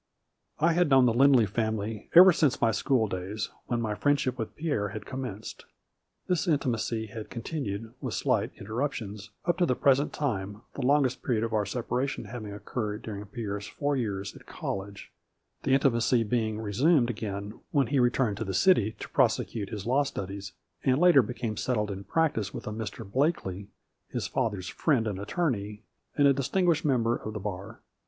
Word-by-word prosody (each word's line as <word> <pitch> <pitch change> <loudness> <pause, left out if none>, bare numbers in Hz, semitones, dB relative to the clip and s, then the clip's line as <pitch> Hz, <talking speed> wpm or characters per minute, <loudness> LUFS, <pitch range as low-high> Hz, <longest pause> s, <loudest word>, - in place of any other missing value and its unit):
I 165 +2 +3
had 175 -1 +3
known 135 -2 +6
the 120 - +3
Lindley 130 -1 +6
family 110 0 -2
ever 185 +1 +10
since 150 -4 +2
my 115 - +3
school 125 -1 +2
days, 95 +2 -4 0.2
when 120 - 0
my 110 -2 -1
friendship 140 +1 +1
with 115 -3 -5
Pierre 150 -10 -1
had 105 0 -7
commenced. 125 -5 -6 0.6
This 180 0 0
intimacy 120 -7 0
had 110 0 -8
continued, 115 -4 -4
with - - -3
slight - - +1
interruptions, 110 -3 -4 0.2
up 175 0 +1
to 175 - +3
the 125 - +2
present 140 +3 +3
time, 105 -7 -3
the - - -5
longest 130 -1 +2
period 115 -3 0
of 115 -1 -2
our 105 -2 +1
separation 125 +5 -2
having 110 -4 -7
oc 100 0 -10
curred 105 -3 -3
during 105 -2 -5
Pierre's 100 -2 -5
four 145 +8 -1
years 100 -6 -3
at - - -15
college, 100 +1 -6 0.5
the 135 -1 +3
intimacy 120 -3 +3
being 110 -1 -1
resumed 120 - +3
again 105 -1 -5
when 140 -2 +2
he 140 +2 +1
returned 120 -4 +2
to 110 - -2
the 95 -3 -3
city 115 - +4
to - - -6
prosecute 100 -4 +1
his 105 -3 -6
law 130 +4 +3
studies, 100 -7 -5 0.3
and 130 0 +3
later 175 -3 +7
became 115 -1 -4
settled 105 -4 0
in 100 0 -6
practice 155 -11 0
with - - -6
a - - -4
Mr. 110 0 -6
Blakely 100 - -1 0.4
his - - -3
father's 100 -5 -2
friend 135 -8 +1
and 100 -3 -3
attorney, 105 - -2 0.3
and 145 -1 +6
a 140 - +6
distinguished 165 +4 +1
member 120 -4 +2
of 110 - -6
the 105 - -4
bar. 100 +2 -6
115 Hz, 175 wpm, -28 LUFS, 105-135 Hz, 0.6 s, ever